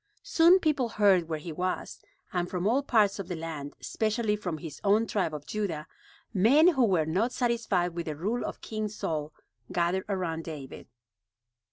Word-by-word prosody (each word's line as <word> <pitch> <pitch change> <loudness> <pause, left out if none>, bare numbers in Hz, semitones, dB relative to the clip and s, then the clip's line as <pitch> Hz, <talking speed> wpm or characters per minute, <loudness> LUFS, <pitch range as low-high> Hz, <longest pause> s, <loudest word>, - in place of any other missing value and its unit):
Soon 360 -7 +6
people 290 -8 +1
heard 195 -6 +3
where 160 - -1
he 160 +2 -7
was, 180 +4 -3 0.3
and 175 -1 -1
from 180 0 -2
all 245 +7 +3
parts 210 -7 +2
of 195 - -5
the 180 - -3
land, 160 -3 -6
especially 220 -1 0
from 180 -6 -4
his 155 -1 -9
own 210 +3 +4
tribe 195 -7 -1
of 150 -1 -7
Judah, 180 -8 -3 0.5
men 260 - +6
who 265 -8 +3
were 180 -7 +2
not 195 +10 0
satisfied 225 -9 0
with 170 0 -5
the 155 - -3
rule 210 +10 -2
of - - -5
King 215 -1 -3
Saul 155 -7 -3 0.4
gathered 175 +2 0
around 170 -4 -2
David. 150 -5 -8
190 Hz, 175 wpm, -28 LUFS, 165-225 Hz, 0.5 s, Soon